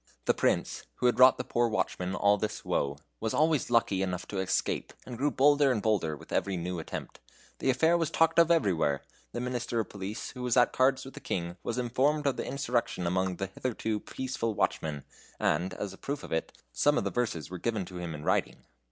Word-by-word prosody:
The - - +4
Prince, - - 0
who - - -3
had 125 0 +3
wrought 130 0 +8
the - - -2
poor 120 -1 +1
watchmen 95 -4 -1
all 100 0 +4
this 105 +1 -4
woe, 70 0 0 0.2
was 110 0 -2
always 155 -3 +2
lucky 115 -5 +2
enough 90 -1 -2
to 100 - -3
escape, 95 - -1
and 125 - -7
grew 140 +5 +1
bolder 145 0 +4
and 120 - +1
bolder 100 -8 0
with - - -15
every 95 -2 0
new 90 +1 -3
attempt. 80 - -7 0.4
The - - 0
affair 160 +6 +4
was 165 -3 0
talked 165 +1 +3
of 170 0 +6
everywhere. 90 - +2 0.3
The - - -4
Minister 120 -1 -2
of 110 - -2
Police, 100 +1 -5
who 125 - -9
was 125 0 +1
at 120 - +5
cards 130 0 +2
with 135 - -10
the - - -8
King, 85 -1 -3
was 120 - -3
informed 135 +5 +1
of 140 - +2
the - - -4
insurrection 125 -9 -1
among 95 +1 0
the 95 - -3
hitherto 110 +2 -3
peaceful 115 -2 -3
watchmen, 75 -7 -1 0.4
and, 90 +5 +1
as 100 -1 -4
a - - -14
proof 145 +1 -4
of - - -9
it, 80 - -1 0.2
some 145 - +3
of - - +1
the - - -2
verses 110 -10 -2
were 90 - -5
given 110 -1 -1
to 90 0 -8
him 85 -3 -4
in 75 - -8
writing. - - 0
115 Hz, 220 wpm, -29 LUFS, 90-130 Hz, 0.4 s, wrought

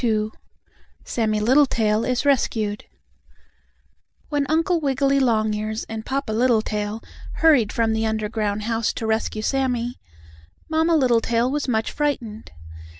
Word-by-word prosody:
II 215 -2 +1 0.8
SAMMIE 215 -2 0
LITTLETAIL 230 -3 +3
IS 250 +2 -1
RESCUED 220 -6 0 1.4
When 290 -2 0
Uncle 330 +2 +2
Wiggily 275 -1 +2
Longears 215 -3 0
and 220 0 -6
Papa 270 -2 -3
Littletail 220 -2 0 0.3
hurried 285 -10 +4
from 225 -2 +1
the 220 0 0
underground 215 -1 -2
house 225 0 -1
to 225 - -5
rescue 220 -1 -1
Sammie, 250 -2 -1 0.7
Mamma 320 +1 +2
Littletail 235 -3 +2
was 295 0 -2
much 225 -3 0
frightened. 245 -7 -3
230 Hz, 115 wpm, -22 LUFS, 220-270 Hz, 1.4 s, hurried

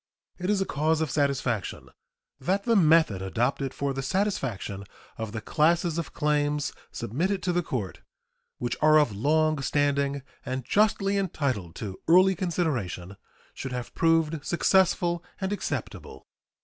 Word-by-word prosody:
It 180 +2 -2
is 210 -2 +2
a - - +1
cause 155 +1 +1
of 160 -4 -1
satisfaction 135 -7 -1 0.5
that 190 +8 0
the 230 0 +2
method 160 - +4
adopted 125 +7 -1
for 140 0 -2
the 135 - -3
satisfaction 135 - -2 0.3
of 110 -2 -5
the 110 0 -5
classes 170 - +2
of 165 - -5
claims 150 -1 0 0.2
submitted 175 - -2
to 180 - 0
the 175 - +2
court, 120 - -4 0.6
which 120 -1 -2
are 155 0 +6
of 145 -9 +2
long 155 +5 +2
standing 140 0 0 0.2
and 130 -1 -4
justly 200 - +2
entitled 140 - -2
to 100 -4 -6
early 185 +3 +6
consideration, 145 - -2 0.4
should 135 -2 -6
have 125 -1 -5
proved 165 -2 +2
successful 175 -1 +2 0.2
and 190 0 -1
acceptable. 205 - -5
150 Hz, 140 wpm, -27 LUFS, 125-175 Hz, 0.6 s, are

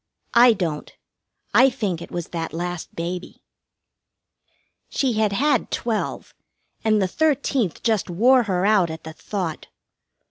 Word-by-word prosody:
I 240 0 +7
don't. 165 -7 -3 0.6
I 265 - +7
think 205 -9 -3
it - - -8
was 175 -2 -5
that 165 -2 -4
last 175 0 -5
baby. 175 +2 -5 1.5
She 265 -3 0
had 215 -1 +1
had 285 +9 +1
twelve, 225 -3 -3 0.5
and 215 -1 +3
the 190 - +2
thirteenth 275 - 0
just 220 -5 +1
wore 245 +9 +4
her 180 0 +1
out 200 -5 +4
at 160 0 -7
the 160 - -8
thought. 180 -2 -5
200 Hz, 135 wpm, -23 LUFS, 175-235 Hz, 1.5 s, I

